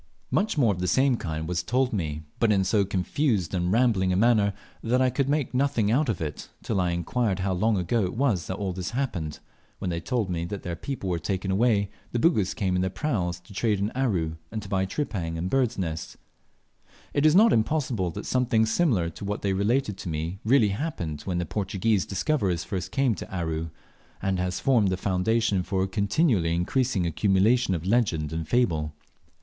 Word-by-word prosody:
Much 205 -4 +1
more 115 -7 +4
of 90 - -7
the 90 - -1
same 130 +3 +3
kind 80 -6 -4
was 90 0 -1
told 125 +5 0
me, 80 -6 -2 0.2
but 115 -2 +3
in 95 -2 +3
so 100 +2 +2
confused 100 - 0
and 90 -1 0
rambling 110 -5 +3
a - - +2
manner 105 -1 +4 0.3
that 120 +2 +1
I 130 -1 +3
could 140 0 0
make 145 -3 0
nothing 125 -5 +1
out 135 +3 +2
of 105 - -1
it, 75 -4 -5
till 100 -4 0
I 90 - +1
inquired 95 +5 0
how 95 0 0
long 105 +4 +2
ago 100 +5 +1
it 90 - -4
was 115 -10 +1
that 95 - -3
all 95 -3 -2
this 90 0 -4
happened, 90 - -2 0.4
when 90 - -3
they 85 - -2
told 115 +3 -1
me 85 -2 -2
that 100 - -4
after 100 - -10
their 85 -1 -3
people 125 +1 -5
were 85 - 0
taken 95 +3 -2
away 100 -1 +2 0.2
the - - +1
Bugis 115 - +2
came 95 -4 0
in 90 - +1
their 95 - 0
praus 95 - -2
to 90 - -15
trade 105 +1 +1
in 100 +3 -1
Aru, 90 -12 -1
and 110 -2 -4
to - - -9
buy 95 -1 0
tripang 95 - -3
and 90 +3 -3
birds' 125 -3 +1
nests. 80 -4 -4 1.0
It 145 - +1
is 155 +1 +5
not 220 +4 +6
impossible 115 - 0
that 80 - -7
something 120 -3 +2
similar 110 - +1
to 90 - -10
what 100 +1 -3
they 100 -1 +1
related 105 +2 0
to 90 - -5
me 80 +4 -3
really 115 -2 +4
happened 95 - -3
when 90 -2 -1
the 90 - 0
early 85 - -9
Portuguese 100 0 0
discoverers 95 - 0
first 95 -4 -4
came 135 -4 +2
to 95 - -8
Aru, 80 -3 -2 0.5
and 95 -1 -1
has 90 0 -1
formed 120 -7 +3
the 95 - 0
foundation 100 +2 +1
for 95 +1 -1
a - - -1
continually 100 - +1
increasing 100 +2 0
accumulation 95 +6 +2
of 85 0 -5
legend 90 -9 +1
and 80 -1 -3
fable. 80 -10 +1
100 Hz, 210 wpm, -26 LUFS, 90-120 Hz, 1.0 s, not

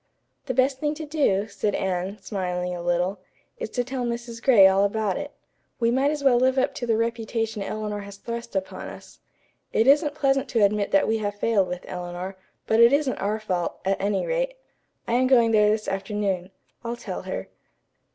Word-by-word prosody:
"The 255 - -2
best 260 +1 +2
thing 295 +1 -1
to 315 0 -6
do," 275 -10 +1
said 205 0 -2
Anne, 190 +1 -2
smiling 180 -3 -2
a 175 - -5
little, 175 +3 0 0.4
"is - - -4
to 245 - -1
tell 255 0 -4
Mrs. 235 -1 -4
Gray 235 -7 +7
all 190 +1 +3
about 205 -1 0
it. 290 0 -4 0.5
We 230 -1 +2
might 265 +3 +2
as 295 -1 -3
well 260 -3 +5
live 260 +1 +2
up 260 - +2
to 240 - -5
the 225 -1 +2
reputation 225 -1 -2
Eleanor 210 +1 -3
has 200 0 -9
thrust 235 +1 -6
upon 190 0 -3
us. - - -12 0.5
It 220 - +2
isn't 290 +2 +4
pleasant 275 -2 +1
to 230 -4 +2
admit 205 0 0
that 195 - +3
we 220 0 +1
have 205 -1 -2
failed 205 -2 +2
with 180 0 -6
Eleanor, 180 +1 -5 0.3
but 220 - +2
it 235 +1 +8
isn't 280 -2 +2
our 210 +2 -1
fault, 180 -5 -2
at 195 0 0
any 200 -1 0
rate. - - -1 0.5
I - - -1
am 255 +2 +3
going 235 -3 +5
there 210 -1 +5
this 215 0 0
afternoon. 195 -2 -2 0.3
I'll 235 0 -3
tell - - -5
her." - - -5
220 Hz, 200 wpm, -25 LUFS, 195-255 Hz, 0.5 s, it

